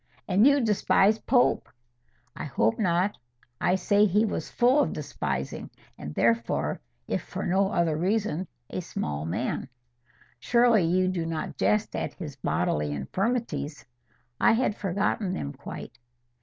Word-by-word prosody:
"And 200 +6 +5
you 285 0 +5
despise 210 -1 +3
Pope." 245 +1 +2 0.7
"I - - -5
hope 110 +2 +1
not. 185 0 +1 0.4
I 180 - +3
say 205 +3 +3
he 210 +3 +3
was - - -3
full 250 +4 +3
of 290 - +1
despising, 75 - -4 0.3
and 75 - -8
therefore, 115 -11 +1 0.3
if - - -1
for - - -6
no 190 +2 +2
other 170 -5 +1
reason, 185 0 0 0.2
a - - -3
small 75 - -4
man." 120 +9 -2 0.7
"Surely 235 - +4
you 185 +2 +2
do 185 -2 -1
not 160 -1 -4
jest 210 0 +1
at - - -3
his 150 -7 -7
bodily 75 - -1
infirmities?" 150 - -2 0.5
"I - - +5
had 230 -2 +1
forgotten 195 0 -1
them 70 - -4
quite." 115 - -9
185 Hz, 140 wpm, -27 LUFS, 140-210 Hz, 0.7 s, And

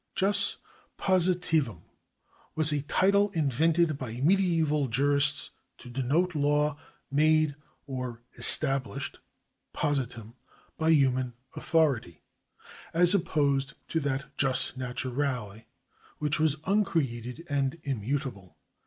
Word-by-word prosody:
Jus 200 +1 +2 0.4
positivum 175 - +1 0.7
was 155 -1 +3
a 145 -1 0
title 200 +7 +2
invented 155 +1 +2
by 120 -4 -5
medieval 160 -3 +2
jurists 140 +3 +1 0.3
to 125 - -12
denote 145 +9 0
law 145 0 +1 0.3
made 155 0 +3 0.3
or 125 -4 -6
established 135 +1 0 0.6
(positum) 120 -6 -2 0.4
by 160 0 0
human 130 -5 +2 0.2
authority, 140 - 0 0.7
as 175 +2 +6
opposed 140 -7 +1
to 165 - 0
that 140 -2 -2
jvs 135 -2 +2
naturale 125 -3 -3 0.5
which 150 +1 -1
was 155 -2 +2
uncreated 155 - -1
and 140 +2 -1
immutable. 130 - -4
145 Hz, 95 wpm, -28 LUFS, 130-160 Hz, 0.7 s, as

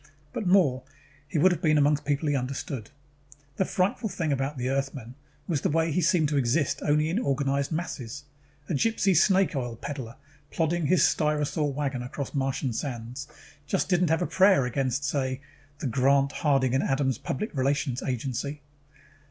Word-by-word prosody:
But 210 - -3
more, 170 -9 +4 0.5
he 145 - -3
would 185 +5 +5
have 175 -2 -2
been 155 -2 +3
among 145 0 +4
people 145 +1 -1
he 145 - +2
understood. 130 -3 -4 0.7
The 190 - +2
frightful 195 +5 0
thing 165 -4 -2
about 135 +1 -1
the 125 0 -2
Earthman 135 -3 -3 0.3
was 155 -6 0
the - - +1
way 160 +1 +1
he 180 - +1
seemed 170 -2 +3
to 150 - 0
exist 135 +3 +1
only 150 +1 +2
in 195 - +1
organized 140 - 0
masses. 145 -5 -4 0.4
A - - -2
gypsy 200 +3 +2
snake 190 +1 +4
oil 120 -3 -3
peddler, 120 -1 -6 0.3
plodding 165 0 0
his 175 -1 +4
syrtosaur 150 -1 +1
wagon 135 -2 -2
across 130 +2 -5
Martian 135 -2 -1
sands, 125 +2 -5 0.4
just 195 - 0
didn't 180 -2 +2
have 160 +2 +2
a - - 0
prayer 190 -8 +4
against, 130 +2 -1
say, 135 -2 -1 0.4
the 150 - -6
Grant, 135 +2 +3
Harding 135 -5 +1
& 135 - +3
Adams 135 -1 0
Public 175 +9 -4
Relations 135 -1 0
Agency. 135 +3 -3
145 Hz, 170 wpm, -27 LUFS, 135-160 Hz, 0.7 s, would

